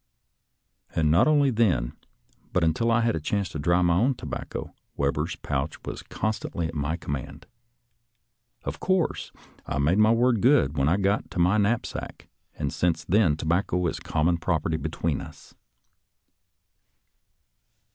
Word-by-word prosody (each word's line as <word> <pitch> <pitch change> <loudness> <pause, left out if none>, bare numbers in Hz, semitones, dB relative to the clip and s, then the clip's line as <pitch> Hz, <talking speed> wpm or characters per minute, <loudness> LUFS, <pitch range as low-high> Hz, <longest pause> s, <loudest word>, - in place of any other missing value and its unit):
And 75 -1 +2
not 85 - +5
only 145 -3 +4
then, 95 - +1 0.6
but 90 - +2
until 80 +9 +1
I 115 +1 +3
had 115 0 +1
a - - -1
chance 100 +5 -1
to 80 - -6
dry 85 +4 +2
my 85 -1 +3
own 120 +10 +2
tobacco, - - -6 0.2
Webber's 70 0 -1
pouch 70 +2 -3
was - - -5
constantly 105 -5 -3
at 80 - -8
my 75 +2 -2
command. 75 0 -6 1.2
Of - - -5
course, 185 -3 0 0.4
I - - -2
made 80 +8 +2
my 110 0 +6
word 115 -1 +3
good 120 - +4
when 70 0 +2
I 90 - +3
got 100 +1 0
to - - -8
my 90 +5 +3
knapsack, 110 +3 -2 0.3
and 70 -2 -3
since 85 -2 0
then 90 -6 +3
tobacco 90 +3 0
is 85 - -1
common 85 +3 0
property 80 -2 0
between 80 -1 -2
us. - - -12
85 Hz, 145 wpm, -26 LUFS, 75-110 Hz, 1.2 s, my